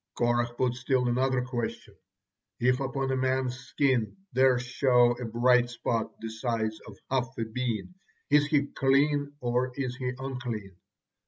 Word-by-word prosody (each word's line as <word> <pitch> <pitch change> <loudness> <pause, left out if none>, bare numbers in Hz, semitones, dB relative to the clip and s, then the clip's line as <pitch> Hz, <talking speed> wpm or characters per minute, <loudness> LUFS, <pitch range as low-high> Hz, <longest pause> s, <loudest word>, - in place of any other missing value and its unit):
Korah 120 0 +1
put 125 0 +1
still 125 0 0
another 130 +1 +1
question: 125 -2 -4 0.7
"If 125 +1 +3
upon 135 0 -2
a - - +1
man's 130 -1 0
skin 125 - 0 0.2
there 130 -1 +5
show 125 -1 +3
a - - -3
bright 120 +2 +3
spot, 120 -1 -2
the 115 - -5
size 110 -1 -2
of 100 -3 -11
half 130 -1 +1
a 115 - -1
bean, 115 - -3 0.4
is 145 0 +5
he 145 -2 +2
clean 145 +1 +2
or 125 +1 0
is 130 -3 -2
he 125 -2 -2
unclean?" 120 -7 -5
125 Hz, 150 wpm, -28 LUFS, 120-130 Hz, 0.7 s, there